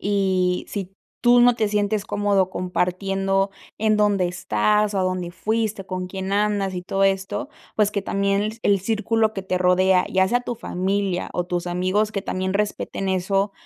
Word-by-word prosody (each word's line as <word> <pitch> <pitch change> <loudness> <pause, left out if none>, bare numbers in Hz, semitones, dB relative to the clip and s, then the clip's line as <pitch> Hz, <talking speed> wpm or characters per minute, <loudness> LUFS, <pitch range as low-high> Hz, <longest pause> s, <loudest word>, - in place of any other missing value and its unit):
y 190 -3 +1
si 195 -2 -5 0.3
tú 245 0 +5
no 245 0 +6
te 220 -2 0
sientes 205 0 0
cómodo 200 -2 +1
compartiendo 195 +2 0 0.3
en 215 0 +2
dónde 205 -3 +2
estás, 180 - +1
o - - +1
a - - +2
dónde 185 -1 -2
fuiste, 215 +1 -2
con 185 0 -4
quién 190 +1 -4
andas 205 -2 +1
y 180 - -4
todo 195 +2 0
esto. 195 +9 -1 0.3
Pues, 210 -1 +2
que 200 -2 -1
también 200 +1 0
el 200 -1 +3
círculo 220 +1 +1
que 195 - -5
te 185 -1 -1
rodea, 185 0 +3
ya 190 0 +4
sea 245 +5 +1
tu 245 -1 -5
familia 190 -2 -2
o 175 - -1
tus 175 0 -2
amigos 185 +4 0
que 200 -2 -3
también 185 -1 -2
respeten 200 -1 -2
eso. 195 +2 0
195 Hz, 175 wpm, -23 LUFS, 185-210 Hz, 0.3 s, no